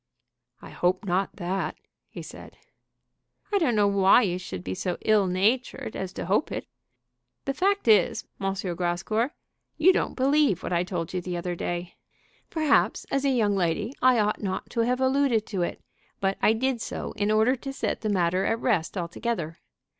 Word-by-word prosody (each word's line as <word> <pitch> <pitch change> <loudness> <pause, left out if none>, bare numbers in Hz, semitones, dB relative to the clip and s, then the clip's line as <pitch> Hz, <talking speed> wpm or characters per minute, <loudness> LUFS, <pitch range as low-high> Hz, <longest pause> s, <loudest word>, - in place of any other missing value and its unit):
"I - - -10
hope 185 +4 0
not 190 +1 0
that," 190 +1 -2 0.3
he - - -8
said. - - -11 1.0
"I 405 - +4
don't 270 - +2
know 205 -1 +4
why 200 +4 +5
you 180 -3 -1
should 95 - -7
be 95 - -3
so 180 - -2
ill 210 -3 +3
natured 215 +6 0
as 190 -1 -4
to - - -5
hope 200 - +1
it. - - -4 0.8
The 275 - -1
fact 395 +2 +1
is, 210 -5 +4 0.2
M. 195 0 0 0.2
Grascour, 180 +7 0 0.5
you 360 +4 +6
don't - - -1
believe 270 - +2
what - - -3
I 170 0 +2
told 180 -3 -4
you 180 - -1
the 175 0 -4
other 175 +1 -3
day. 175 0 -4 0.5
Perhaps 310 -4 +2
as 275 0 0
a - - +4
young 220 -6 +2
lady 195 +6 0
I 255 -1 +5
ought 210 -1 +1
not 190 -3 -4
to 235 - -3
have 245 +2 +2
alluded 260 -4 +2
to 190 -3 -3
it, 175 - -3 0.4
but 195 0 0
I 220 - +5
did 250 +1 -1
so - - -4
in 205 0 -1
order 220 +4 +3
to 270 +3 -6
set 270 - -2
the 215 - -1
matter 185 -1 +1
at 225 - +1
rest 205 -7 0
altogether. 170 -1 -3
205 Hz, 185 wpm, -26 LUFS, 180-250 Hz, 1.0 s, you